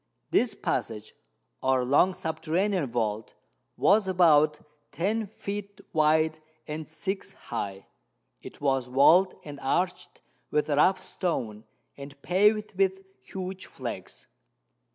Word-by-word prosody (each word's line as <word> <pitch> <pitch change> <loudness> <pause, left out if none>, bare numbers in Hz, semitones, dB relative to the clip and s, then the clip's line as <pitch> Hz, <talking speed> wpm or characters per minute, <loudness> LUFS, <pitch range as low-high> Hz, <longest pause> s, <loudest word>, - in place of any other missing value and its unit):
This 230 -4 +2
passage, 110 - -3 0.5
or 130 -1 +2
long 160 +8 +4
subterranean 165 +1 -1
vault, 110 -2 -2 0.4
was 200 0 +4
about 155 -5 +4 0.3
ten 210 +6 -1
feet 200 -1 -6
wide 155 0 +3 0.3
and 155 +1 -5
six 190 +5 -4
high. 100 -4 -6 0.6
It - - -11
was 135 -3 0
walled 165 +9 +5
and 145 -2 -8
arched 180 +7 -2 0.3
with 150 +1 0
rough 185 +6 +3
stone, 120 - -3 0.3
and 140 0 -11
paved 210 +4 +2
with 190 0 +1 0.2
huge 185 +7 -7
flags. - - -7
160 Hz, 110 wpm, -27 LUFS, 140-190 Hz, 0.6 s, walled